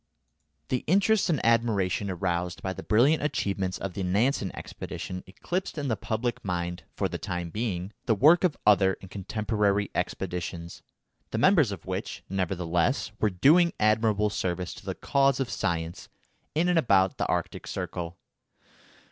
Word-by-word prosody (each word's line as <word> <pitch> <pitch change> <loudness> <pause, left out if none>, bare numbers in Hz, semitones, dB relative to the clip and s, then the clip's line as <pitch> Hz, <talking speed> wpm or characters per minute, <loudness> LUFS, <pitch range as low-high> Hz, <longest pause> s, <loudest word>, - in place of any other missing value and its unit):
The 125 - 0
interest 200 +3 +3
and 155 -5 +2
admiration 105 -4 +2
aroused 90 -1 -2
by 95 - -2
the - - -7
brilliant 130 +9 +3
achievements 95 -10 -1
of 95 -2 -5
the 100 - -4
Nansen 100 +3 +1
expedition 90 0 -6
eclipsed 175 - -4
in 140 -2 -2
the 115 - +1
public 115 +2 -3
mind, 90 -2 -3
for - - 0
the - - -5
time 90 -2 -4
being, 100 -3 -3
the 115 - +4
work 155 - +6
of 180 -5 +2
other 95 -2 +5
and 95 - -12
contemporary 105 0 0
expeditions, 90 -2 -4 0.5
the - - -3
members 155 - +4
of 100 - -7
which, 95 0 -4
nevertheless, 90 - 0
were 110 - +3
doing 155 - +4
admirable 110 -1 +2
service 90 -2 -2
to - - -13
the - - -2
cause 140 -1 +2
of 135 -3 -1
science 85 0 -3 0.5
in 165 +3 +2
and 175 -2 +4
about 95 - +3
the - - 0
Arctic - - -2
Circle. 85 -1 -5
100 Hz, 155 wpm, -27 LUFS, 90-125 Hz, 0.5 s, work